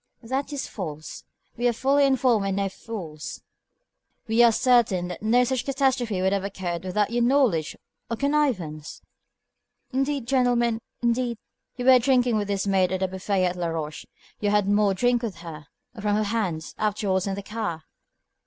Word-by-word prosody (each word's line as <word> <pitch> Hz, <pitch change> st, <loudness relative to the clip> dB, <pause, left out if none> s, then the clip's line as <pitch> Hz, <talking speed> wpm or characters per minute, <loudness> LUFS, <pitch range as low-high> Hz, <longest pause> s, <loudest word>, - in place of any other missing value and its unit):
"That 265 Hz, +5 st, -2 dB
is 285 Hz, -2 st, -3 dB
false. 155 Hz, -6 st, -7 dB, 0.3 s
We 240 Hz, +1 st, +1 dB
are 240 Hz, -, +2 dB
fully 275 Hz, +4 st, +3 dB
informed 250 Hz, -6 st, +2 dB
and 195 Hz, -, -1 dB
no 200 Hz, -1 st, 0 dB
fools. 180 Hz, -8 st, -8 dB, 0.8 s
We 225 Hz, +1 st, +3 dB
are 235 Hz, -1 st, +7 dB
certain 220 Hz, -7 st, +2 dB
that 180 Hz, -, -7 dB
no 235 Hz, +4 st, +4 dB
such 255 Hz, 0 st, -1 dB
catastrophe 260 Hz, -7 st, 0 dB
could 190 Hz, +1 st, +2 dB
have 200 Hz, -1 st, 0 dB
occurred 185 Hz, -3 st, -4 dB
without 205 Hz, +3 st, 0 dB
your 240 Hz, 0 st, +1 dB
knowledge 240 Hz, -, +2 dB, 0.3 s
or 230 Hz, -, -2 dB
connivance." 230 Hz, -, -1 dB, 0.9 s
"Indeed, 270 Hz, 0 st, -1 dB
gentlemen, 240 Hz, -3 st, +2 dB, 0.2 s
indeed 235 Hz, 0 st, +1 dB, 0.2 s
" -, -, -56 dB
"You 250 Hz, -, -3 dB
were 260 Hz, -1 st, +8 dB
drinking 245 Hz, -2 st, +2 dB
with 205 Hz, -1 st, -1 dB
this 200 Hz, -1 st, -1 dB
maid 190 Hz, -2 st, +2 dB
at 190 Hz, -, -1 dB
the 190 Hz, -, +2 dB
buffet 190 Hz, 0 st, -1 dB
at 180 Hz, 0 st, -1 dB
Laroche. 165 Hz, -3 st, -4 dB, 0.3 s
You 205 Hz, -, 0 dB
had 205 Hz, -1 st, +2 dB
more 205 Hz, -1 st, +3 dB
drink 245 Hz, +3 st, +2 dB
with 225 Hz, -6 st, -4 dB
her, 160 Hz, -4 st, -10 dB, 0.3 s
or 225 Hz, -, -9 dB
from 205 Hz, 0 st, +1 dB
her 215 Hz, -, +1 dB
hands, 200 Hz, -7 st, -2 dB
afterwards 200 Hz, -3 st, 0 dB
in 195 Hz, -, -1 dB
the 200 Hz, -, -6 dB
car." 205 Hz, -7 st, -4 dB
210 Hz, 175 wpm, -25 LUFS, 185-245 Hz, 0.9 s, were